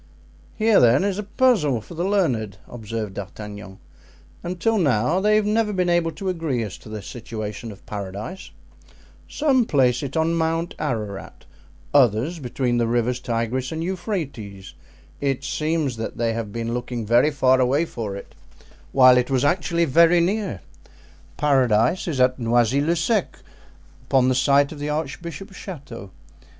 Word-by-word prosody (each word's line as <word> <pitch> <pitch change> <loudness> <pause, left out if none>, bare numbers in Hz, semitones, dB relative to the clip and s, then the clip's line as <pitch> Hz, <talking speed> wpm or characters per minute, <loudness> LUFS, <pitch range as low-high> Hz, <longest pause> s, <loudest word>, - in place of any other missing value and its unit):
"Here, 220 -1 +4
then, 125 +6 +5
is 200 0 -1
a - - -2
puzzle 200 - +2
for 110 - -12
the 170 +1 -3
learned," 130 - 0
observed 110 -3 -5
D'Artagnan, 100 0 -8 0.6
"until 185 +5 0
now 140 - +2
they 210 +2 +3
have 215 -1 +2
never 215 0 +1
been 180 -3 +1
able 170 -1 +2
to 195 - -6
agree 160 -9 -1
as 105 -4 -6
to - - -13
the 110 -2 -6
situation 110 0 -6
of 100 - -14
Paradise; 105 - -6 0.8
some 275 -5 +2
place 130 - +2
it 140 +1 -4
on 160 +1 +2
Mount 165 +1 -1
Ararat, 110 -9 -4 0.5
others 135 - +3
between 125 -2 -1
the 115 - +1
rivers 120 +1 0
Tigris 120 +2 -2
and 160 0 -3
Euphrates; 155 - -5 0.5
it 135 -1 -1
seems 155 -2 -1
that 110 - -5
they 115 -1 0
have 110 -2 -4
been 115 +1 -3
looking 120 -1 -4
very 120 +7 +4
far 130 -3 +3
away 135 +6 +2
for 110 -10 -5
it, 100 - -10 0.6
while 130 -2 +7
it 125 - -2
was 130 0 +1
actually 170 +1 +1
very 170 +4 +5
near. 185 - -1 0.8
Paradise 130 - +2
is 150 -6 -2
at 125 0 +3
Noisy 120 +3 +2
le 165 +4 +1
Sec, 195 +4 0 0.7
upon 130 -2 +3
the - - +3
site 140 +2 +3
of 155 - -8
the 145 +1 -3
archbishop's 170 +6 -5
chateau. 140 - -9
135 Hz, 155 wpm, -23 LUFS, 115-170 Hz, 0.8 s, while